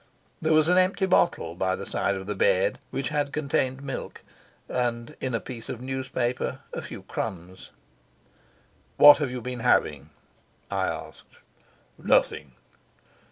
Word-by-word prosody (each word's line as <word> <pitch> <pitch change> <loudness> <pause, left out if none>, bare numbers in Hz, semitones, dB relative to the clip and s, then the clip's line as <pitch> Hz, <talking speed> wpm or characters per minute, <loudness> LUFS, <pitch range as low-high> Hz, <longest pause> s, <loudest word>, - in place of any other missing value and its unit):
There 160 - +1
was 155 0 +5
an 180 +1 +5
empty 190 +1 +2
bottle 170 - +2
by 95 +2 0
the 100 +1 -7
side 100 - -1
of 95 0 -6
the 105 - -3
bed, 95 - +2
which 135 -3 -3
had 145 -1 -1
contained 140 -3 -1
milk, 135 -2 -6 0.4
and 120 -2 -2
in 130 -3 -1
a - - 0
piece 115 -2 -9
of 120 - -5
newspaper 130 -1 -3
a - - -4
few - - -9
crumbs. 90 +1 -6 1.3
"What 145 0 +10
have 145 -3 -1
you 125 0 -5
been 125 -1 -4
having?" 75 - +1 0.6
I - - 0
asked. - - -7 0.6
"Nothing." 70 -4 +1
125 Hz, 145 wpm, -26 LUFS, 100-140 Hz, 1.3 s, What